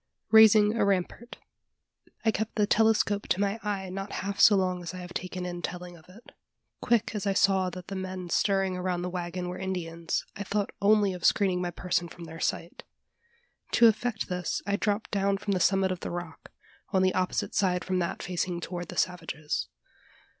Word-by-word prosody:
RAISING 220 -1 +7
A - - +2
RAMPART. 200 +4 -1 0.9
I 220 - +5
kept 220 +1 -3
the 210 - +3
telescope 210 -1 +2
to 185 - +1
my 200 +2 0
eye 195 -3 -3
not 195 +1 -5
half 200 0 -4
so 210 - +8
long 185 -2 0
as 175 +1 -6
I - - -6
have 180 0 -8
taken 185 0 -4
in 175 -1 -5
telling 180 0 -6
of 165 +1 -18
it. 210 +6 -16 0.5
Quick 235 -2 +1
as 210 -2 -3
I 195 - +2
saw 190 -1 +3
that 180 0 -9
the 195 - -6
men 185 -1 -5
stirring 195 +1 +1
around 180 -1 -2
the 180 - -3
waggon 180 0 -4
were 180 - -5
Indians, 170 -3 -3
I 200 - -4
thought 205 0 -1
only 205 -1 +4
of 180 -2 -8
screening 185 -3 +3
my 175 - -1
person 175 0 -1
from 170 - -11
their 165 0 -9
sight. 170 - -3 0.9
To 235 - +6
effect 220 0 0
this, 180 -2 -2
I 200 0 +1
dropped 205 +1 -1
down 200 -1 +1
from 200 0 -2
the 185 - 0
summit 190 +1 +3
of 185 - -3
the - - -5
rock 175 -2 -7 0.4
on 190 -2 +2
the 185 - +3
opposite 185 -1 -1
side 185 -3 +1
from 185 -1 0
that 170 - -3
facing 180 0 -2
toward 175 0 -5
the - - -9
savages. 165 -4 -2
185 Hz, 195 wpm, -28 LUFS, 180-200 Hz, 0.9 s, so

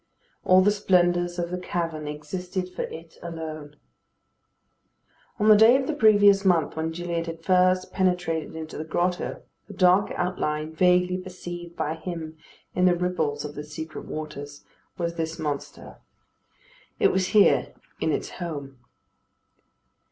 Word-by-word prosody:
All 185 0 +6
the 205 +2 +4
splendours 175 -3 +2
of 175 0 -2
the 180 - -3
cavern 165 -4 -3
existed 180 +5 -5
for - - -4
it 165 0 -8
alone. 155 -3 -7 1.6
On 215 - +1
the 215 - +9
day 220 +4 +7
of 265 - -2
the 310 - -1
previous 205 -6 +5
month 175 -6 +2
when 160 0 -2
Gilliatt 170 0 -3
had 165 0 -7
first 185 0 +2
penetrated 175 -4 0
into 160 -1 -7
the - - -3
grotto, 175 +3 -2 0.2
the 205 - -10
dark 185 +2 +4
outline, 155 -3 -2
vaguely 180 +2 +3
perceived 175 -2 -8
by 155 - -2
him 160 -1 -6 0.4
in 180 - +2
the 180 -1 +5
ripples 160 -5 -1
of 150 - -6
the 150 - -6
secret 155 +1 -7
waters, 145 -2 -7 0.3
was 170 -1 -3
this 165 0 -3
monster. 150 -3 -5 1.0
It - - +4
was 185 -1 +1
here 205 +1 +4 0.2
in - - 0
its - - -2
home. 140 -7 -6
175 Hz, 145 wpm, -25 LUFS, 160-185 Hz, 1.6 s, the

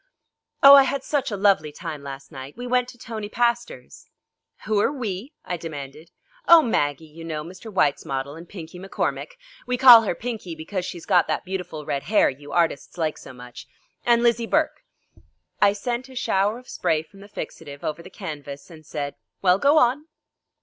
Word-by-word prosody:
"Oh, 275 0 +11
I 280 - +10
had 270 0 -1
such 285 -4 -1
a 205 - -3
lovely 190 -7 +3
time 155 -2 -7
last 140 -1 -9
night. 135 +1 -9
We 245 - -6
went 250 0 +1
to - - -13
Tony 220 -3 -6
Pastor's." 235 +1 -2 0.6
"Who 215 -1 +1
are 210 - +2
'we'?" 235 -2 -5
I 175 - -3
demanded. 155 -1 -8 0.4
"Oh, 335 -2 +9
Maggie, 145 - 0
you 160 +2 -12
know, 155 -2 -4
Mr. 185 +7 -10
Whyte's 150 -7 +1
model, 135 +1 -4
and 165 +1 -12
Pinkie 180 -2 -9
McCormick 195 +1 -3 0.3
we 250 - 0
call 245 -3 +10
her 205 -5 -2
Pinkie 215 -7 -5
because 180 +4 -4
she's 170 -2 -8
got 180 -4 +3
that - - -2
beautiful 180 -5 -5
red 140 -1 -2
hair 210 0 +3
you 145 +2 -12
artists 170 -2 0
like 160 -3 -1
so - - -11
much 125 -1 -12 0.4
and 235 0 +3
Lizzie 235 -1 +2
Burke." 310 - 0 0.8
I 200 -1 +5
sent 240 +5 -4
a 260 - -13
shower 205 -2 +1
of 250 0 -15
spray 155 -1 0
from 195 +5 -19
the 200 +1 -13
fixative 145 -7 -8
over 155 +2 -3
the 185 - -12
canvas, 150 -5 -8
and 155 -1 -13
said: 145 -1 -5 0.3
"Well, 185 0 +4
go 285 +6 +4
on." 285 +3 +3
185 Hz, 190 wpm, -24 LUFS, 155-235 Hz, 0.8 s, Oh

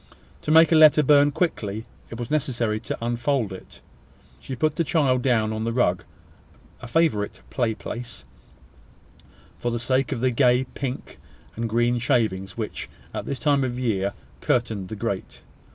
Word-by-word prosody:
To - - -6
make 160 +1 +7
the 165 - +4
letter 155 -1 +7
burn 145 0 +5
quickly, 110 - -2 0.2
it 115 - -7
was 120 +2 -5
necessary 120 -7 0
to 110 - -5
unfold 120 -2 0
it. 95 - -12 0.6
She 130 - -6
put 155 +4 0
the 170 - +1
child 140 -4 +2
down 115 -4 +2
upon 110 0 -3
the 115 - -1
rug 105 -9 +1 0.8
a - - -8
favourite 120 -7 0
play 115 -4 0
place, 115 - -7 1.3
for 120 - -1
the 120 - -1
sake 130 +4 0
of 130 - -2
the 130 +1 +2
gay 125 0 +3
pink 135 -2 -5 0.4
and 115 0 -3
green 120 +2 +2
shavings 105 -5 0
which, 110 -2 -5 0.2
at - - -5
this 140 - -2
time 140 -1 +2
of 125 -2 -2
the 130 - -4
year, 100 -4 0 0.3
curtained 110 - 0
the 110 - -5
grate. 100 -3 -4
120 Hz, 170 wpm, -24 LUFS, 110-140 Hz, 1.3 s, make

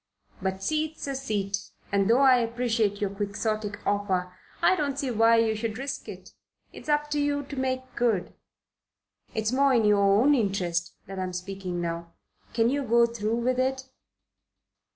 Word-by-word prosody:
But 190 0 -1
a 190 - -17
seat's 310 +7 -2
a 275 - -3
seat, 205 -7 -2 0.3
and 200 0 +2
though 240 +4 +5
I 260 -2 +7
appreciate 230 -3 0
your 200 -2 0
Quixotic 205 +1 -3
offer, 190 -3 0 0.3
I 375 - +4
don't 285 -5 -2
see 275 -3 -1
why 230 0 +5
we 225 -1 +1
should 220 0 -3
risk 270 +2 -5
it. - - -10 0.4
It's - - -10
up 295 0 +1
to 295 - +1
you 285 0 0
to 280 +1 -8
make 260 -1 -3
good. 220 -7 0 1.0
It's 220 0 0
more 270 0 +3
in 225 -2 +3
your 210 -1 +4
own 205 +9 +5
interest 190 -8 0
that 195 0 -7
I'm 185 -1 -3
speaking 180 0 -4
now. 170 0 -4 0.4
Can 230 +1 +2
you 285 +1 0
go 235 -2 +4
through 230 -1 -2
with 255 +1 +1
it?" 265 0 -1
225 Hz, 175 wpm, -27 LUFS, 200-265 Hz, 1.0 s, I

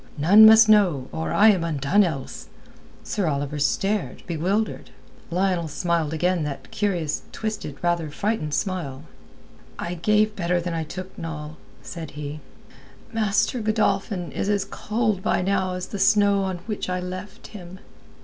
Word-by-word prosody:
None 200 +9 +8
must 220 0 +8
know, 185 -12 +4
or 160 - -3
I 215 +2 +6
am 190 -5 +3
undone 165 +5 +2
else." 155 -8 -4 0.6
Sir 200 -5 -2
Oliver 145 0 -2
stared, 195 +7 -1
bewildered. 185 +6 -2 0.4
Lionel 180 -1 0
smiled 165 0 -1
again 175 +2 0
that 145 -2 -6
curious 175 -7 -1
twisted, 215 -10 -5
rather 170 -2 0
frightened 155 -2 -2
smile. 170 -10 -3 0.7
"I 170 - -4
gave 210 +4 +2
better 175 -1 0
than 175 0 -3
I 165 -1 -2
took, 185 +4 -8
Noll," 155 -2 -6 0.3
said 165 -4 -7
he. 150 0 -5 0.7
"Master 215 +2 +1
Godolphin 200 -4 0
is 200 - -2
as 200 -1 +1
cold 215 -1 -1
by 185 - 0
now 190 -1 0
as 180 0 -4
the 200 - -5
snow 200 -1 +4
on 185 -2 -4
which 210 -4 -4
I 180 0 -1
left 185 +4 -7
him." 185 -3 -10
180 Hz, 150 wpm, -24 LUFS, 160-205 Hz, 0.7 s, None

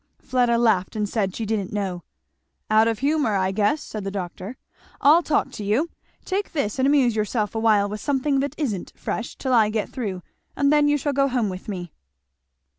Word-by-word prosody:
Fleda 245 -3 +1
laughed 220 -6 +2
and 210 -1 -1
said 200 -3 -1
she 225 - -3
didn't 205 -3 -2
know. 195 -4 -3 0.7
"Out 220 +1 +5
of 225 -1 0
humour, 280 -4 +1
I 190 -1 +1
guess," 210 +9 +1
said 215 -2 -6
the 195 - -3
doctor. 195 +3 -6 0.4
"I'll 310 +5 +6
talk 310 - 0
to 210 - -7
you! 235 +12 0 0.3
Take 395 +2 -2
this 270 -6 -1
and 260 - +3
amuse 270 -5 +3
yourself 215 -1 -1
awhile, 220 -3 +3
with 210 +1 -6
something 275 0 +1
that 280 +1 -2
isn't 220 - -3
fresh, 235 - -4
till 260 -2 -2
I 220 -3 +5
get 215 -1 -2
through, 200 -8 -4 0.3
and 280 +1 +3
then 295 -1 +4
you 295 0 +3
shall 290 0 -1
go 275 0 +3
home 245 -5 0
with 185 0 -7
me." 175 -5 -6
225 Hz, 195 wpm, -23 LUFS, 205-275 Hz, 0.7 s, I'll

